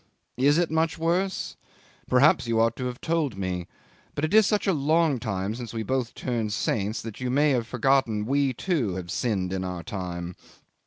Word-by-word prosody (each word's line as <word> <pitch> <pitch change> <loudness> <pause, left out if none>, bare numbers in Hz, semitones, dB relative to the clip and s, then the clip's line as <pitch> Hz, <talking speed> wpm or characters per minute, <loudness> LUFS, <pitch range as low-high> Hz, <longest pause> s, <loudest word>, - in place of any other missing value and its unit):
Is 140 +4 +4
it 175 -2 +1
much 160 +1 +1
worse? 175 +4 -1 0.5
Perhaps 125 0 +4
you 115 -1 +1
ought 115 0 +3
to 130 - -3
have 125 0 -6
told 155 -10 0
me; 90 -2 -3 0.5
but 145 - 0
it 155 - -3
is 215 -2 +6
such 210 -1 +1
a 195 - +3
long 155 -1 +2
time 100 -3 -2
since 120 -1 -7
we 110 - -2
both 125 +1 -2
turned 115 -4 -2
saints 105 -1 -1
that 115 +1 -8
you 125 - -1
may 145 +3 +3
have 120 -3 0
forgotten 125 -4 +1
we, 140 +2 +2
too, 125 - -1
had 90 -2 -5
sinned 95 -5 -1
in 95 -1 -2
our 90 -2 -4
time? 90 -1 -5
125 Hz, 195 wpm, -26 LUFS, 105-150 Hz, 0.5 s, is